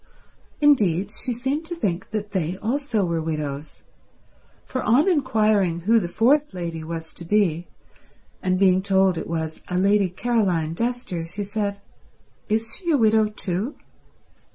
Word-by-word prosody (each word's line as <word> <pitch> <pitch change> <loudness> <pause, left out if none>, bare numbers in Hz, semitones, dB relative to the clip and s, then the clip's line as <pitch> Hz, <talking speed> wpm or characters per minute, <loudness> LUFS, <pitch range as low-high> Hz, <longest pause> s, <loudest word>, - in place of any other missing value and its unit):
Indeed, 205 - +3
she 245 - -2
seemed 265 +6 -2
to 345 +1 -5
think 195 - -2
that 210 -1 -4
they 180 -1 -1
also 230 -2 -1
were 170 -2 -1
widows, 150 -2 -5 0.8
for 260 - -3
on 255 - +3
inquiring 215 - +2
who 225 +6 +4
the 175 - -3
fourth 260 - +2
lady 170 -2 -4
was 160 0 -6
to - - -9
be, 175 -3 +1 0.7
and 185 0 +1
being 185 -1 +4
told 190 -1 +3
it - - -6
was 160 -1 -3
a 180 - -2
Lady 200 0 +3
Caroline 185 -6 0
Dester, 230 -5 -2
she 205 +3 -3
said, 200 0 -3 0.7
"Is 225 +2 0
she 345 - -5
a 305 - +4
widow 220 -2 +4
too?" 210 +4 -3
200 Hz, 150 wpm, -23 LUFS, 175-230 Hz, 0.8 s, who